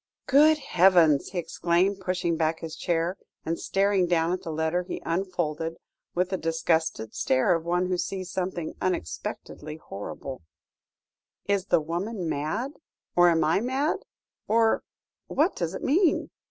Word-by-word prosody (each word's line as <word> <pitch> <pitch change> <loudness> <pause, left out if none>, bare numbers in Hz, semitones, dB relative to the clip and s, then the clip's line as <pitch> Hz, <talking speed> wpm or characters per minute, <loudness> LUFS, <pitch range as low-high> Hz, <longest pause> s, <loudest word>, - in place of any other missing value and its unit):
"Good 305 +3 +6
heavens!" 175 - +4
he 185 - -6
exclaimed, 175 +3 +1
pushing 180 -2 -1
back 160 0 0
his 160 -1 -6
chair, 170 +2 -1 0.3
and 165 +1 -2
staring 195 -2 +2
down 170 0 +2
at 185 - -3
the - - -7
letter 160 +3 0
he 180 - -5
unfolded, 165 -2 -2 0.4
with 180 +1 +1
the 190 - -1
disgusted 160 -8 0
stare 130 +7 +2
of 165 -1 -2
one 175 +1 +1
who 180 -1 -1
sees 185 -1 -3
something 180 -4 -3
unexpectedly 150 - -4
horrible, 130 - -7 1.0
"is 200 -2 +1
the - - +3
woman 175 +4 -3
mad? 160 - -2 0.4
or 175 0 +7
am 165 -2 +3
I 160 +4 +3
mad? 265 +6 0 0.5
or 225 0 +3 0.5
what 310 +6 +1
does 170 +1 -2
it - - -6
mean?" 330 +4 +2
175 Hz, 145 wpm, -27 LUFS, 160-195 Hz, 1.0 s, or